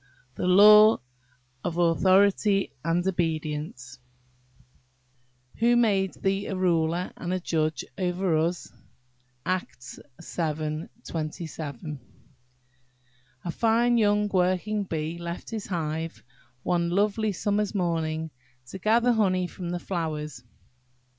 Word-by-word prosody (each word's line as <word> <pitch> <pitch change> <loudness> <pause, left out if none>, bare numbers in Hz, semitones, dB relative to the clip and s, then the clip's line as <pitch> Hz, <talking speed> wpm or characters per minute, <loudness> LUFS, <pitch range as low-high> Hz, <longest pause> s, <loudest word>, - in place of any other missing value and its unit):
THE 180 - -2
LAW 210 +3 +8 0.7
OF 170 - -3
AUTHORITY 195 +3 +3
AND 170 +2 0
OBEDIENCE 155 -7 -3 1.6
"Who 240 +1 +3
made 200 -5 +2
thee 195 +1 -1
a 195 - -3
ruler 175 -1 0
and 175 - -5
a 185 - 0
judge 155 -3 -1
over 180 -1 0
us?"–ACTS 130 -3 -5 0.4
vii. 155 -1 -2 0.2
27. 155 -3 -5 1.5
A 175 - -1
FINE 235 +4 +2
young 210 -1 +3
Working 190 +3 0
bee 160 0 -3
left 170 0 -6
his 220 -2 -5
hive, 165 -2 -3 0.4
one 170 -1 +1
lovely 210 +3 +1
summer's 205 +2 -1
morning, 160 -3 -1 0.4
to 190 - -7
gather 230 +5 +3
honey 190 -5 +2
from 175 0 -7
the 175 - -2
flowers. 155 -8 -4
175 Hz, 100 wpm, -26 LUFS, 160-200 Hz, 1.6 s, LAW